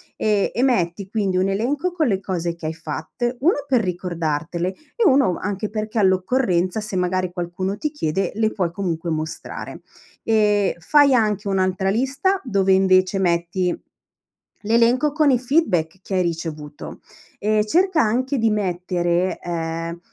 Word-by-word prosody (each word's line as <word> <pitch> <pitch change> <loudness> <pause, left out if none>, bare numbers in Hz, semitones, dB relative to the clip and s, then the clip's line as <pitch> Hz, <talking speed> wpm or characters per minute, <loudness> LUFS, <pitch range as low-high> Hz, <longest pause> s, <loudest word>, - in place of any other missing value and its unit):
E 210 -2 +1
e 240 - +1
metti 195 -6 0
quindi 200 -4 -1
un 190 +1 +2
elenco 275 - -1
con 330 -4 0
le 195 -5 +1
cose 175 -3 -3
che 170 - -10
hai 155 - -2
fatte, 165 +10 -4
1: 295 -1 +2
per 255 -4 +3
ricordartele, 170 -2 -2 0.3
e 470 - +1
1: 265 - +4
anche 205 +2 -3
perché 215 +1 -3
all'occorrenza, 185 -1 +1
se 210 -2 -5
magari 185 0 0
qualcuno 180 +2 -3
ti 300 - -2
chiede, 195 - -1
le 220 0 +1
puoi 180 -4 -1
comunque 170 -3 -3
mostrare. 155 0 -5 0.4
E 210 -3 +2
fai 285 - +4
anche 210 -4 +1
un'altra 190 0 0
lista 270 - +1
dove 195 -6 +1
invece 190 0 +3
metti, 175 0 0 0.9
l'elenco 235 +6 +3
con 305 -1 +3
i 250 - +3
feedback 190 - +1
che 190 - -4
hai 185 - +3
ricevuto. 160 -3 -5 0.4
Ehm, 215 +1 +2
cerca 345 - +2
anche 255 +5 0
di 225 -1 +2
mettere, 180 -2 -1
ehm, 165 0 -4
195 Hz, 150 wpm, -21 LUFS, 175-235 Hz, 0.9 s, 1